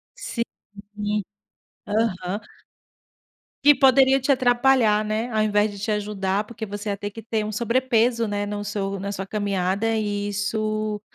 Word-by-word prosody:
Sim, 235 - -3 0.5
uhum, 210 0 -1 0.7
aham. 205 -3 -1 1.2
Que 290 +1 +8
poderiam 270 0 +5
te 275 +2 +1
atrapalhar, 245 -4 +3
né, 215 +3 -2
ao 215 - +1
invés 210 0 +2
de 200 - -9
te 205 - -3
ajudar, 205 -1 -1
porque 220 0 -7
você 205 +1 -5
ia 200 - -1
ter 205 +1 -4
que 225 +2 -10
ter 220 -1 -1
um 215 - -4
sobrepeso, 235 0 +1
né, 205 0 -2
no 205 0 -4
seu 200 -1 -3
na 200 +1 -4
sua 195 -1 -4
caminhada 200 +1 0
e 205 -1 -1
isso 215 +1 -2
210 Hz, 155 wpm, -24 LUFS, 205-230 Hz, 1.2 s, Que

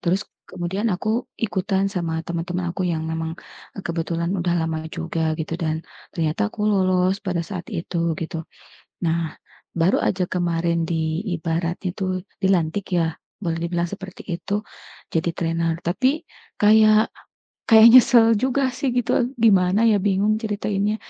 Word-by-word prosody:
Terus 185 +3 0 0.2
kemudian 190 +5 -2
aku 220 +7 -1
ikutan 195 -2 0
sama 165 -3 -2
teman-teman 175 +1 -3
aku 185 - -2
yang 160 -2 -1
memang 160 0 -3 0.5
kebetulan 170 0 -2
udah 175 -1 0
lama 160 -1 -3
juga 165 -1 -1
gitu 160 0 -3
dan 160 -1 -1 0.3
ternyata 155 - 0
aku 210 - -4
lolos 185 -1 +2
pada 180 -2 -1
saat 180 -1 -7
itu, 170 0 -1
gitu. 165 0 -4 0.6
Nah, 165 -1 -1 0.4
baru 170 +2 +3
aja 185 -1 +1
kemarin 170 -1 0
di 160 +1 -1
ibaratnya 170 +2 -2
tuh 185 -1 -2 0.2
dilantik 190 0 +1
ya, 165 -2 +1 0.3
boleh 165 -2 -1
dibilang 170 0 -1
seperti 190 -2 -8 0.2
itu 205 +3 -2 0.5
jadi 165 +1 0
trainer. 165 0 0
Tapi 260 - +1 0.4
kayak 215 +1 +5 0.6
kayak 220 -1 +9
nyesel 240 -2 +7
juga 260 +4 +1
sih 265 +2 -2
gitu. 245 0 +1 0.3
Gimana 195 -1 +4
ya 215 -2 +4
bingung 205 +1 +2
ceritainnya. 210 -1 -1
180 Hz, 135 wpm, -22 LUFS, 165-205 Hz, 0.6 s, kayak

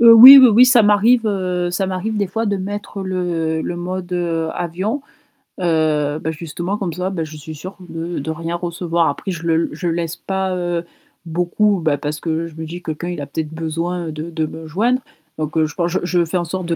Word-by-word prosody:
Heu, 235 -1 +9
oui, 255 +5 +12
oui, 260 - +9
oui, 235 +3 +7
ça 250 -3 +6
m'arrive 210 +4 +4 0.5
ça 190 +2 -1
m'arrive 190 +4 -3
des 205 -1 0
fois 225 +4 -2
de 200 -1 0
mettre 200 +1 -5
le 170 -4 -1
le 175 - -4
mode, 180 +1 -5
heu, 165 -2 -1
avion, 190 - -3 0.6
heu, 155 -3 +1
bah, 160 +1 -2
justement, 170 +5 -4
comme 190 -4 -3
ça, 185 +3 -3
je 155 -1 -8
suis 155 +1 -9
sûre 185 +7 -9
de 165 +1 -4
de 150 +3 -3
rien 165 +1 -4
recevoir, 170 -1 -1
après 165 +7 -3
je 170 -2 -6
le 165 0 +2
je 165 +4 -4
laisse 165 -1 -2
pas, 190 -1 -2
heu, 175 -1 -2 0.4
beaucoup, 180 +5 +1
bah, 155 -3 +1
parce 150 +2 -4
que 165 0 -2
je 165 - -13
me 160 0 -6
dis: 175 +3 -7
«Quelqu'un, 160 +1 -4
il 175 -4 -4
a - - -4
peut-être 155 +2 -5
besoin 165 +2 -3
de 155 +2 -6
de 160 -2 -2
me 160 +1 -8
joindre», 235 - +1 0.4
donc 155 0 -3
je 155 - -2
pense 170 -1 0
je 185 - 0
je 175 -1 +1
fais 165 +3 -1
en 175 - 0
sorte 185 +2 -4
de 170 0 -1
175 Hz, 220 wpm, -19 LUFS, 160-190 Hz, 0.6 s, oui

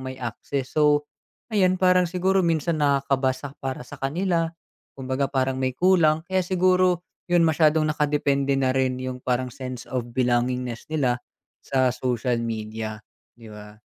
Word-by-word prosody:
may 130 0 -6
access, 125 +2 -5
so, 150 -1 +3 0.5
ayan 185 -3 +3
parang 180 -1 +3
siguro 190 +2 +1
minsan 165 -2 0
nakakabasa 140 -1 0
para 130 -2 -4
sa 145 +2 -12
kanila, 165 +4 0 0.5
kumbaga 130 +1 -1
parang 130 -1 0
may 130 -1 -1
kulang 165 -2 +3
kaya 190 - +2
siguro 185 -1 +2 0.2
'yun 175 -1 +3
masyadong 155 -1 +3
naka-depende 145 -2 +1
na 130 -1 +2
rin 130 -1 +1
yung 130 0 -4
parang 125 0 -1
sense 125 -1 -7
of 125 -2 -2
belongingness 125 -1 0
nila 130 -6 0 0.4
sa 130 -2 +1
social 125 -1 -1
media, 110 -1 -5 0.3
'di 115 -2 -13
ba? 105 0 -11
135 Hz, 145 wpm, -24 LUFS, 125-165 Hz, 0.5 s, so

